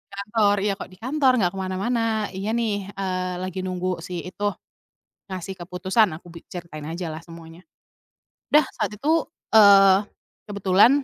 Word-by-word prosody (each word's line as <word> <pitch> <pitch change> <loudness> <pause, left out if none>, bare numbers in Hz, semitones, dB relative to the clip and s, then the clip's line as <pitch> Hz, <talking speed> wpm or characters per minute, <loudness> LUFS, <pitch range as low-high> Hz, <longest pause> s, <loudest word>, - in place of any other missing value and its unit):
Kantor 205 +1 +2
"Iya 200 -1 -1
kok - - -6
di 185 - -16
kantor, 260 +4 +2
nggak 190 -8 +2
kemana-mana." 210 +3 -1
"Iya 195 +4 -3
nih, 205 -4 -2
eee, 185 -2 -2
lagi 185 0 -4
nunggu 185 -1 -2
si 175 0 -6
itu 205 +3 -3 0.8
ngasih 185 +1 -5
keputusan," 185 +3 +1
aku 175 - -18
bi 170 -1 -12
ceritain 170 -4 -8
aja 165 +3 -5
lah 160 +1 -7
semuanya. 165 +1 -13 0.9
Dah 300 - +8 0.2
saat - - -1
itu, 305 +9 +1 0.3
eee, 200 -2 +7 0.4
kebetulan 200 +8 +4
195 Hz, 145 wpm, -24 LUFS, 180-215 Hz, 0.9 s, Dah